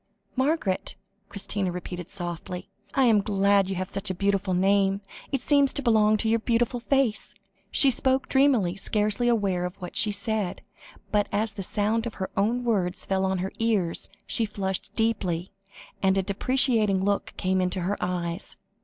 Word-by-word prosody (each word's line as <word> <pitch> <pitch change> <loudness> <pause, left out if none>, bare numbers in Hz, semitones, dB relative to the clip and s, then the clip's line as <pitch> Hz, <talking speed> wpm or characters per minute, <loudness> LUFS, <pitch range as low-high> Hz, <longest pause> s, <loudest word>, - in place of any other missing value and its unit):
"Margaret," 260 - 0 0.3
Christina 200 -1 -2
repeated 180 0 -6
softly; 175 0 -5 0.2
"I 270 - +4
am 225 -4 +5
glad 200 -1 +2
you 195 - -2
have 185 +1 -3
such 195 +2 -2
a 185 - -2
beautiful 195 0 0
name. 195 +1 +2 0.3
It 275 -3 0
seems 280 0 +4
to 280 - -1
belong 215 -3 +4
to 220 - -1
your 230 +1 +3
beautiful 240 +1 0
face." 255 -3 0 0.3
She 275 - +5
spoke 260 +2 +1
dreamily, 260 -10 +3
scarcely 210 +4 0
aware 200 -6 +1
of 180 +1 -4
what 180 -2 -8
she 210 - +5
said, 205 -2 -2 0.5
but 210 -1 +2
as 215 +1 0
the 200 - -6
sound 215 +4 0
of 230 - -7
her 190 - -4
own 230 +5 +1
words 190 -7 0
fell 190 0 0
on 190 0 0
her 195 - -5
ears, 210 -7 0 0.2
she 230 - +1
flushed 195 -3 -3
deeply, 190 -6 -1 0.5
and 190 0 +3
a 195 - +2
deprecating 210 -1 +2
look 200 0 -1
came 185 0 +1
into 180 0 -1
her 190 +4 -1
eyes. 175 0 -3
200 Hz, 170 wpm, -26 LUFS, 190-230 Hz, 0.5 s, am